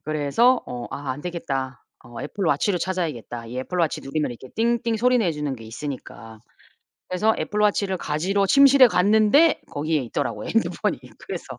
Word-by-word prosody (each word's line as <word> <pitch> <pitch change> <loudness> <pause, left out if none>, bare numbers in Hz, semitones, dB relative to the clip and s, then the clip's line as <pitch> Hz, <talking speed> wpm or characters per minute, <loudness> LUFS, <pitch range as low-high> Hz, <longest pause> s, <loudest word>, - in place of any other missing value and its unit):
그래서 155 - +2
어 120 -1 -6
'아 140 -1 -5
안되겠다. 135 -5 -5 0.2
어 120 +1 -9
애플워치를 180 +3 0
찾아야겠다.' 155 -11 -4
이 120 +2 -6
애플워치 165 +4 -1
누르면 150 0 -2
이렇게 125 +2 -10
띵띵 230 0 +1
소리 250 +2 +3
내주는 150 - -1
게 115 - -12
있으니까. 115 -3 -8 0.7
그래서 215 +5 +1
애플워치를 205 -3 0
가지러 185 +7 0
침실에 275 +2 +7
갔는데 215 - +4
거기에 155 +1 -1
있더라고, 115 - -3
핸드폰이. - - 0 0.2
그래서 - - -7
170 Hz, 385 characters per minute, -23 LUFS, 135-210 Hz, 0.7 s, 침실에